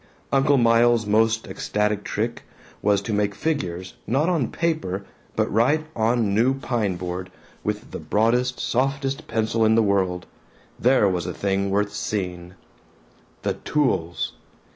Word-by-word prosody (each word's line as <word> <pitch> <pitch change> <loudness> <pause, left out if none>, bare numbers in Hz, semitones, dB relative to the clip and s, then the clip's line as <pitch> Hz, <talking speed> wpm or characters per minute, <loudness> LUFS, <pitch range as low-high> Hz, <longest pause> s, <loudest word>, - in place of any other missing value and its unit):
Uncle 140 +1 +4
Miles's 115 -1 +4
most 110 +2 +2
ecstatic 105 0 -1
trick 115 +3 -2 0.4
was 100 -1 +2
to 110 - -3
make 105 -1 0
figures 95 - -2
not 140 - +2
on 160 -9 +1
paper 155 - -1 0.3
but - - +2
right 145 +8 +3
on 115 +2 +2
a - - +1
new 110 +6 +2
pine 115 -8 -1
board, 90 +1 -5 0.3
with - - -3
the - - -5
broadest 125 +4 +1
softest 135 +3 -1
pencil 110 0 0
in 110 0 +4
the 115 - +4
world. 95 -3 +1 0.5
There 125 -4 +4
was 90 -3 -1
a - - -4
thing 100 0 0
worth 105 +1 0
seeing! 90 -4 -4 0.9
The - - +1
tools! 105 - -1
110 Hz, 140 wpm, -24 LUFS, 100-125 Hz, 0.9 s, Uncle